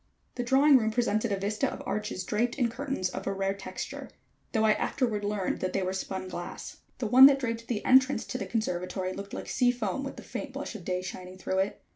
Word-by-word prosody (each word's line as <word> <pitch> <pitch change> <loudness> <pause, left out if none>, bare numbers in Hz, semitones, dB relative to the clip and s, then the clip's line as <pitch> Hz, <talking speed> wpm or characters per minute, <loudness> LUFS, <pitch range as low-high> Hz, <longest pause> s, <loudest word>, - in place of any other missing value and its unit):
The 245 - -3
drawing 270 +3 +6
room 220 -1 +1
presented 220 -1 0
a 200 - +1
vista 210 +7 -1
of - - -7
arches 210 -3 -3
draped 235 +3 0
in 245 -3 +1
curtains 265 -7 -2
of 190 - -6
a 195 - 0
rare 195 0 0
texture, 200 -1 -7 0.4
though 220 -2 +1
I 220 - +5
afterward 220 -3 -1
learned 205 -2 -1
they 185 +1 -1
were 185 +1 -1
spun 190 0 -4
glass. 175 -1 -7 0.2
The 245 - -3
one 255 +5 +10
that 275 -1 +4
draped 230 -3 -3
the 225 -4 -2
entrance 260 +1 +5
to 255 - -4
the - - -4
conservatory 185 -4 -2
looked 200 +1 -7
like - - -6
sea 250 -2 +2
foam 245 +1 -1
with 275 - -5
the - - -10
faint 280 -3 -6
blush 280 +2 -5
of 215 -5 -8
day 180 +1 -2
shining 185 0 -7
through 190 0 -1
it. 195 +2 -1
215 Hz, 225 wpm, -29 LUFS, 190-250 Hz, 0.4 s, one